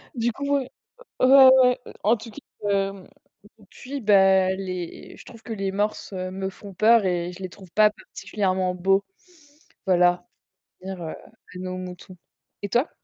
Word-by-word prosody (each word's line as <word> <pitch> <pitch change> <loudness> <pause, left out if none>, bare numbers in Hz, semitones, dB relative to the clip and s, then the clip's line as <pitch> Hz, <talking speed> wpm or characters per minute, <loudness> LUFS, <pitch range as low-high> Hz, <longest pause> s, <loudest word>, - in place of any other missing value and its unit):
du 235 0 0
coup, 280 +4 -1
ouais, 260 -1 -4 0.5
ouais, 265 +1 +8 0.2
ouais, 250 0 +3 0.2
en 225 +4 +3
tout 225 +1 -11
cas, - - -13 0.3
hem, 195 -1 -2 0.5
depuis 255 +7 -9
bah, 190 -3 +4
les 185 -3 -7
je - - -14
trouve 230 -2 -14
que 230 - -7
les 195 -2 -3
morses, 205 +1 -2
heu, 185 -1 -4
me 190 0 -4
font 200 0 -12
peur 220 +1 +4
et 175 -1 -1
je 190 +2 -11
les 185 - -4
trouve 185 -1 -15
pas 215 0 +5
particulièrement 190 -4 -3
beaux, 195 +2 +1 0.8
voilà, 175 -1 +3 0.5
pour 190 - -9
revenir 180 -3 -7
à - - -6 0.4
nos 185 0 -5
moutons 180 0 -9 0.4
et 200 - -4
toi? 245 - +1
195 Hz, 165 wpm, -24 LUFS, 185-220 Hz, 0.8 s, ouais